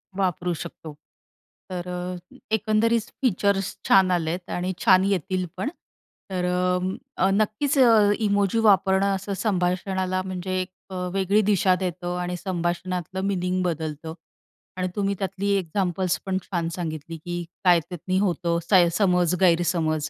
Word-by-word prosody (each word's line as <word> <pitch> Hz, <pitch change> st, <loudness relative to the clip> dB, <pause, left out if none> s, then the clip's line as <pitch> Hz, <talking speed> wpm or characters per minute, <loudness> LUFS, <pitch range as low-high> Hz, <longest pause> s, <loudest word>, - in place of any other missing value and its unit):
वापरू 180 Hz, -2 st, 0 dB
शकतो. 160 Hz, -2 st, -8 dB, 0.8 s
तर 180 Hz, -1 st, -5 dB
अ, 180 Hz, 0 st, -6 dB, 0.2 s
एकंदरीत 220 Hz, +2 st, +2 dB, 0.2 s
फीचर्स 200 Hz, -4 st, +1 dB
छान 190 Hz, -1 st, +5 dB
आलेत 175 Hz, +1 st, -1 dB
आणि 180 Hz, +1 st, -2 dB
छान 185 Hz, -2 st, +6 dB
येतील 185 Hz, -1 st, 0 dB
पण. 280 Hz, -, -1 dB, 0.6 s
तर 180 Hz, -1 st, -2 dB, 0.7 s
अ, 190 Hz, -, +3 dB
नक्कीच 215 Hz, +8 st, +1 dB
अ, 225 Hz, -5 st, +6 dB
इमोजी 205 Hz, 0 st, +1 dB
वापरणं 195 Hz, -2 st, +3 dB
असं 195 Hz, +1 st, -4 dB
संभाषणाला, 185 Hz, -1 st, 0 dB
म्हणजे 185 Hz, 0 st, -3 dB
एक 185 Hz, -, -5 dB, 0.2 s
अ, 190 Hz, -, -7 dB, 0.2 s
वेगळी 195 Hz, +2 st, +2 dB
दिशा 190 Hz, -2 st, +3 dB
देतं 180 Hz, -1 st, -3 dB
आणि 180 Hz, 0 st, -3 dB
संभाषणातलं 180 Hz, 0 st, -3 dB
मीनिंग 185 Hz, -1 st, 0 dB
बदलतं 160 Hz, -2 st, -3 dB, 0.6 s
आणि 185 Hz, 0 st, -1 dB
तुम्ही 200 Hz, -1 st, 0 dB
त्यातली 195 Hz, +1 st, -2 dB
एक्झाम्पल्स 185 Hz, 0 st, -1 dB
पण 190 Hz, -1 st, 0 dB
छान 170 Hz, -3 st, -2 dB
सांगितली, 165 Hz, -2 st, -5 dB
की 175 Hz, +2 st, -5 dB, 0.2 s
काय 175 Hz, -2 st, +6 dB
त्यातनी 185 Hz, +1 st, -2 dB
होतं 175 Hz, -3 st, 0 dB, 0.4 s
समज-गैरसमज 175 Hz, -4 st, +2 dB
185 Hz, 125 wpm, -24 LUFS, 175-195 Hz, 0.8 s, छान